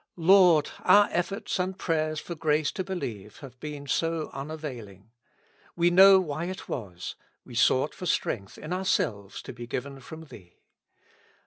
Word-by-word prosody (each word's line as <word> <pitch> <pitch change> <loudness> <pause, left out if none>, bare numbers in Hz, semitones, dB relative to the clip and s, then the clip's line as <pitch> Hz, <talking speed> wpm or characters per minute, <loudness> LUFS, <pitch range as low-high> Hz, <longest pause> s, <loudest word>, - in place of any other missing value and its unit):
Lord! 175 -3 +5
our 205 0 +5
efforts 180 +3 -2
and 185 +1 -2
prayers 155 -3 -1
for 170 - -7
grace 155 -2 0
to 190 - -4
believe 110 - -6
have 130 -3 -12
been 150 -1 -7
so 165 +2 -1
unavailing. 130 - -8 0.6
We 175 0 +3
know 190 +2 +8
why 155 -2 -3
it 185 +2 -6
was: 95 -8 -6 0.3
we - - -12
sought - - +2
for - - -6
strength 100 -1 -2
in 155 +4 -6
our 185 +1 -2
selves 110 - -1
to - - -8
be 120 0 -9
given 135 +3 -5
from 160 +5 -10
Thee. 90 - -15
155 Hz, 155 wpm, -27 LUFS, 125-175 Hz, 0.6 s, know